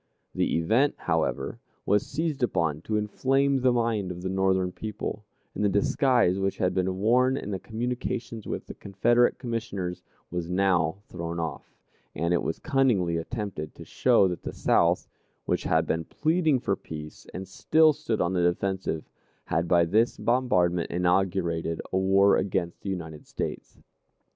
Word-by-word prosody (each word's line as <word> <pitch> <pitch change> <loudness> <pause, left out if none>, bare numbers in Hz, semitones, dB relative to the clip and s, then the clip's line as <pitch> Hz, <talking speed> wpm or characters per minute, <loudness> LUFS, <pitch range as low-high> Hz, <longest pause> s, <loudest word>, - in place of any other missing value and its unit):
The - - +1
event, 115 - +2
however, - - -1 0.3
was 105 0 +3
seized 150 -1 -2
upon 80 -10 0
to 110 - 0
inflame 135 +6 +1
the 130 0 +4
mind 115 -5 0
of 90 0 -7
the 95 - -2
Northern 95 -1 +1
people, 105 +1 -5 0.3
and - - -2
the 105 - +4
disguise 100 -1 +2
which 95 0 -1
had 90 -1 +1
been 95 0 0
worn 125 +6 +3
in 105 - -5
the 95 - -2
communications 115 0 -4
with - - -4
the - - -8
Confederate 120 +5 +2
Commissioners 110 -7 -4 0.3
was 90 -1 -3
now 90 -3 +2
thrown 85 -1 -5
off, 80 -1 -5 0.4
and 85 +3 0
it 85 - +2
was 80 - -2
cunningly 120 - +1
attempted 95 -4 -5
to - - -10
show 95 - +3
that 90 -1 -4
the - - -6
South, 85 +1 +2 0.4
which - - -1
had 80 0 +2
been 80 +1 -1
pleading 160 - +1
for 100 -5 0
peace 75 -4 -9
and 95 0 -6
still 155 - +4
stood 145 -7 -2
on 90 +1 +1
the 90 - +1
defensive, 90 -2 -1 0.4
had 85 +2 0
by 85 -1 +4
this 110 +7 +2
bombardment 90 -9 +1
inaugurated 90 -2 0
a - - +3
war 95 +1 +4
against 85 -3 -2
the 100 - -5
United 80 -5 -6
States. - - -5
95 Hz, 160 wpm, -27 LUFS, 85-115 Hz, 0.4 s, the